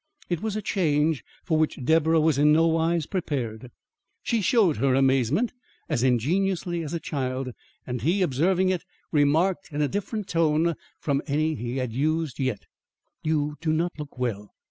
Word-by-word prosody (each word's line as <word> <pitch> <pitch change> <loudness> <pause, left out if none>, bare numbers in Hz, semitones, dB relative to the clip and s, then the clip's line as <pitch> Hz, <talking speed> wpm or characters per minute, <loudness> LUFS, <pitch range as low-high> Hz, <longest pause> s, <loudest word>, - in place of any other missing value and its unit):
It 175 - 0
was 215 -2 -2
a 215 - -3
change 155 -6 +1 0.2
for 160 -3 +1
which 155 - +1
Deborah 160 +2 +4
was 155 -3 +2
in 150 +1 +5
no 160 +2 +5
wise 165 0 +1
prepared. 125 - -3 0.5
She 230 -2 +1
showed 195 - +3
her 130 +3 +2
amazement 135 - +2 0.3
as 145 -7 0
ingenuously 170 - +1
as 155 +2 -4
a - - -1
child, 130 -4 -3 0.3
and 125 -2 -4
he, 175 - +2
observing 180 +6 +2
it, 185 -3 -1 0.3
remarked 160 +6 +2
in 150 0 0
a - - +2
different 205 +3 -3
tone 165 -1 +2 0.3
from 140 -2 0
any 155 +3 +1
he 120 -2 -4
had 125 -3 -2
used 155 +2 -1
yet: 130 -6 -2 0.6
"You 150 -1 -1
do 160 -1 0
not 170 +2 0
look 145 -3 -8
well. 110 -5 -3
155 Hz, 165 wpm, -26 LUFS, 135-170 Hz, 0.6 s, in